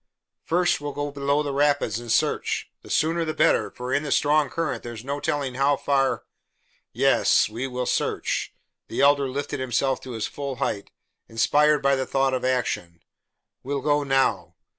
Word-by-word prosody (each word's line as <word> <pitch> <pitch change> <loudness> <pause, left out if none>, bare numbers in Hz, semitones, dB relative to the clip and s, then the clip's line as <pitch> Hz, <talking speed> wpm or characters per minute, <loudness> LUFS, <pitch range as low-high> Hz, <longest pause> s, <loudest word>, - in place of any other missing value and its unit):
"First, 175 -2 +1
we - - -8
will 145 - -3
go 145 0 -3
below 140 +1 0
the 140 -1 -3
rapids 140 -6 +1
and 120 -1 -6
search; - - 0
the - - -15
sooner 165 +2 +1
the 155 -1 -3
better, 105 - +3
for 125 +4 -5
in 140 - +2
the 150 -2 -5
strong 150 0 +3
current 165 +2 -2
there 120 - -7
is 115 +2 -10
no 140 +1 -3
telling 140 -3 -2
how 135 +2 +2
far 135 -1 +1 0.3
" - - -41 0.2
"Yes, - - +4
we 115 +5 -4
will 125 -1 -3
search." - - -1 0.4
The - - -2
Elder 140 -1 +4
lifted 140 +1 -4
himself 130 +1 0
to 130 - -8
his 110 -2 -2
full 140 -2 -5
height, 100 -4 -3 0.4
inspired 150 +6 +3
by 140 0 +4
the 130 -1 -2
thought 135 -1 +1
of 130 - -1
action. 120 -10 -2 0.6
"We'll 140 +1 -3
go 145 +1 +2
now." 135 -1 +1
140 Hz, 185 wpm, -24 LUFS, 125-145 Hz, 0.6 s, Yes